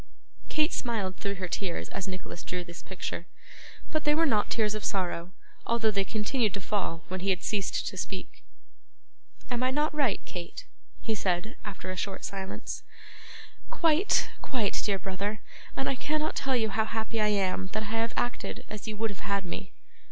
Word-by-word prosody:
Kate 310 +2 +3
smiled 210 -7 0
through 200 0 -1
her 185 -1 -2
tears 175 0 -1
as 195 - -3
Nicholas 185 -2 -5
drew 180 -1 -2
this 170 0 -8
picture; 180 -2 -4 0.6
but 310 -1 +1
they 295 0 +5
were 330 +1 +5
not 210 -8 +3
tears 215 -2 +3
of 215 -1 -3
sorrow, 180 -2 0 0.4
although 225 -2 +4
they 200 -1 +3
continued 215 +1 +1
to - - -2
fall 185 -5 -1
when 185 +1 -2
he 195 +2 0
had 185 -1 +2
ceased 200 -3 +1
to - - -2
speak. - - -4 1.1
'Am 245 0 +1
I 255 - +4
not 295 +4 +2
right, 275 -9 +3
Kate?' 180 - -5 0.4
he 225 - +1
said, 190 +2 +1
after 195 -2 -4
a - - -3
short 190 +1 -2
silence. 195 -1 -4 0.9
'Quite, 335 -6 +4
quite, 230 -7 +1
dear 200 -2 +2
brother; 195 +3 -2 0.4
and 270 - +1
I - - +3
cannot 305 +4 0
tell 270 -1 +2
you 220 -3 +3
how 220 +2 +2
happy 220 0 0
I 210 - +5
am 190 -2 +2
that 215 0 +1
I 220 +2 -1
have 230 0 +1
acted 245 - -1
as 210 +1 -5
you 215 -1 -3
would 225 0 +1
have 195 - -8
had 200 -1 0
me. 185 +2 -4
210 Hz, 185 wpm, -30 LUFS, 190-235 Hz, 1.1 s, they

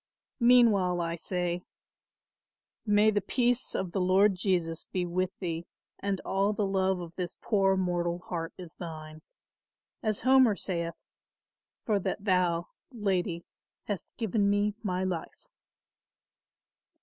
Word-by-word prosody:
Meanwhile 225 -8 +5
I 170 0 -1
say, 175 0 -2 1.3
May 210 +1 +5
the 205 -1 +1
peace 245 +3 +1
of 185 -2 -2
the 190 - -1
Lord 190 +3 +4
Jesus 180 -4 -1
be 180 -1 0
with 180 +1 0
thee 170 -2 -4 0.3
and 200 -1 -1
all 200 +2 +1
the 205 0 0
love 190 -1 +1
of 170 -1 -7
this 180 -2 -4
poor 195 -3 +2
mortal 175 -2 0
heart 170 -2 -5
is 175 -3 -10
thine; 155 -2 -8 0.8
as 215 -2 -1
Homer 260 -3 +5
saith; 170 -3 -3 0.9
'for 210 -3 +2
that 195 +2 -3
thou, 180 -3 +2 0.2
lady, 190 -7 -1 0.4
hast 205 -3 -4
given 215 -2 +1
me 205 +1 +2
my 185 -3 -1
life. 180 -3 -4
185 Hz, 125 wpm, -29 LUFS, 175-205 Hz, 1.3 s, Meanwhile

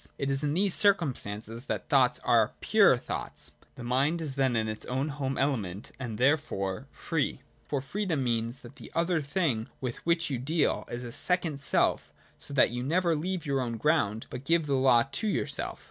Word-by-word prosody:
It 140 0 -1
is 135 +2 0
in 145 +1 0
these 195 0 +2
circumstances 120 - +1
that - - -3
thoughts - - +4
are - - +3
pure - - +5
thoughts. - - -4 0.2
The 120 - -9
mind 135 +7 +1
is 155 -4 -3
then 130 -2 +1
in 110 -1 +1
its 110 0 -4
own 135 +4 -1
home 135 -2 -3
ele 135 -1 +2
ment 100 -1 -7
and 120 -5 -5
therefore 125 -9 0
free: - - -2 0.3
for 140 - -1
freedom 165 0 -2
means 120 +1 -1
that - - -13
the - - -11
other 170 -1 +1
thing 140 - -1
with 125 -3 -4
which 170 -2 0
you 130 - -1
deal 155 +6 0
is 120 +1 -5
a 120 - -6
second 170 -1 0
self— 140 - +1 0.3
so - - -4
that 140 -4 +4
you 120 +1 -3
never 170 +5 +1
leave 175 +2 -3
your 140 -2 0
own 120 -2 -3
ground 110 -6 +1
but 125 - -6
give 165 +2 +2
the 140 - -1
law 130 -3 +5
to 220 - -2
your 205 - 0
self. - - 0
135 Hz, 200 wpm, -29 LUFS, 120-160 Hz, 0.3 s, pure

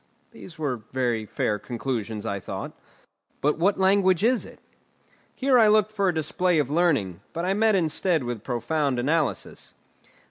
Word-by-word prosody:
These 170 - -12
were 145 -5 -2
very 120 -4 -1
fair 105 +1 -1
conclusions, 115 -3 -4
I 100 - -2
thought. - - -6 0.7
"But 150 +2 0
what 195 +4 +2
language 190 -1 +3
is 245 +2 +2
it?" - - -13 0.8
Here 265 -2 +3
I 220 - +6
looked 215 0 +3
for 200 -3 +1
a - - 0
display 170 +3 +1
of 145 -3 0
learning, 145 - +1
but 170 +1 -3
I 190 - +1
met 215 +1 +3
instead 165 -2 +1
with 120 -3 -5
profound 130 +3 -1
analysis. 150 +4 -2
155 Hz, 155 wpm, -25 LUFS, 120-190 Hz, 0.8 s, I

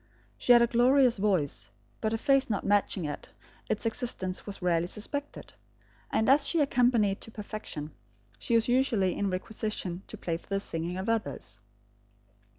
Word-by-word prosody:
She - - +1
had 240 -1 +8
a - - +6
glorious 245 +1 +4
voice, 190 -8 0 0.3
but 220 - 0
her 225 - 0
face 275 +3 +2
not 205 - -2
matching 200 -3 +1
it, 145 - -6 0.4
its - - -1
existence 220 -6 -2
was 200 - -4
rarely 175 -2 +1
suspected; 285 +9 -5 0.6
and 220 - +1
as 280 +2 +5
she 335 - +1
accompanied 245 -8 +2
to - - -7
perfection, 210 -8 -6 0.5
she 230 - 0
was 230 0 +3
usually 240 -7 +2
in 200 - -1
requisition 190 -1 -3
to 220 - -8
play 170 -4 -2
for - - -19
the 195 0 0
singing 170 -1 -4
of 190 +3 -4
others. 225 - -2
215 Hz, 160 wpm, -29 LUFS, 185-240 Hz, 0.6 s, had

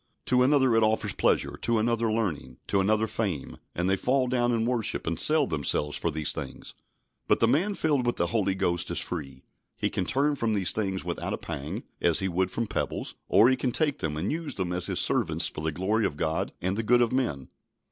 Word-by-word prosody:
To 125 0 +3
another 130 -2 +4
it 115 - +4
offers 110 0 +1
pleasure; - - +1
to 115 -1 +1
another 115 0 +1
learning; 100 - -2
to 100 - +1
another 110 +3 +2
fame, 100 -10 -3 0.2
and 90 +1 0
they 95 - +3
fall 130 +5 +1
down 120 -1 +1
and 115 -1 +1
worship, 120 -3 -1
and 80 +1 -2
sell 155 -1 +4
themselves 75 - 0
for 85 - -1
these 80 -1 0
things. - - -7 0.5
But - - +3
the 115 - +4
man 175 - +1
filled 145 -8 +1
with 120 - +1
the 85 - 0
Holy 95 +1 0
Ghost 85 -2 0
is 85 - -3
free. 70 -6 -5 0.3
He - - -1
can 95 - -1
turn 145 +8 +1
from 115 -4 0
these 95 -3 +2
things 95 -3 -2
without - - -3
a - - -2
pang, 70 +2 -5 0.2
as 85 -2 +3
he 95 - 0
would 95 +1 0
from 115 +4 -2
pebbles; - - -3
or, 105 +5 +6
he 130 - +4
can 130 -1 -1
take 150 +1 0
them 75 -2 -2
and 90 +6 -1
use 155 -2 -3
them 90 -2 -2
as 90 0 -1
his - - -1
servants - - +1
for - - -6
the 80 0 -1
glory 100 +6 +1
of 75 - -8
God 80 +1 -1
and 95 +2 0
the 110 - -1
good 120 +2 +4
of 115 - -1
men. 115 - -1
110 Hz, 230 wpm, -27 LUFS, 85-125 Hz, 0.5 s, or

